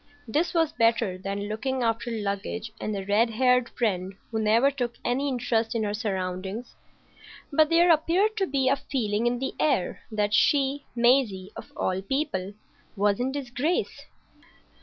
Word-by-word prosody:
This 305 +10 0
was 325 -2 +2
better 230 -4 +2
than 200 +2 -4
looking 255 +5 -2
after 230 +1 0
luggage 215 0 -3
and 215 - -2
a 195 - -5
red 210 +4 +3
haired 250 +1 +2
friend 190 -5 -2 0.2
who 220 - -1
never 230 +6 +4
took 245 -3 -3
any 270 +4 0
interest 235 -3 0
in 225 - 0
her 205 -1 -1
surroundings. 195 +1 -4 0.8
But 310 +1 +4
there 340 +1 +5
appeared 345 +7 +2
to 385 -2 +1
be 270 -1 0
a 270 - +4
feeling 230 -4 -1
in 240 0 +1
the 265 +2 -3
air 270 -12 +1
that 210 -1 0
she, 280 +2 +2
Maisie,—of 235 -6 +1
all 185 0 -1
people,—was 205 -3 -3
in 255 +2 0
disgrace. 280 +4 -2
235 Hz, 150 wpm, -26 LUFS, 205-270 Hz, 0.8 s, there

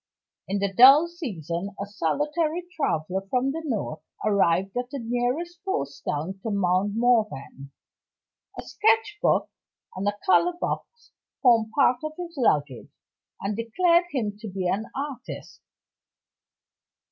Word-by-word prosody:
In 200 - -1
the 200 -1 -1
dull 275 - +8
season, 200 - -5
a 200 - -2
solitary 300 - -1
traveler 185 - -1
from 255 +3 +1
the 325 +3 -4
North 210 - -3 0.2
arrived 195 -2 +2
at 245 0 -2
the 280 - -5
nearest 250 +9 -2
post 140 - -3
town 165 +7 -3
to 225 - -3
Mount 200 0 +1
Morven. 215 - 0 0.9
A - - -5
sketchbook 440 -1 +1 0.5
and 190 +2 -3
a 205 0 0
color 355 -1 +4
box 475 +5 -5 0.3
formed 225 -3 +4
part 260 -3 +4
of 310 0 -4
his 350 -1 -6
luggage, 145 - 0 0.5
and 200 +1 -2
declared 340 - +2
him 220 -9 -2
to 220 - -7
be 190 -2 -3
an 210 +5 -1
artist. 275 -3 -6
230 Hz, 130 wpm, -25 LUFS, 195-300 Hz, 0.9 s, dull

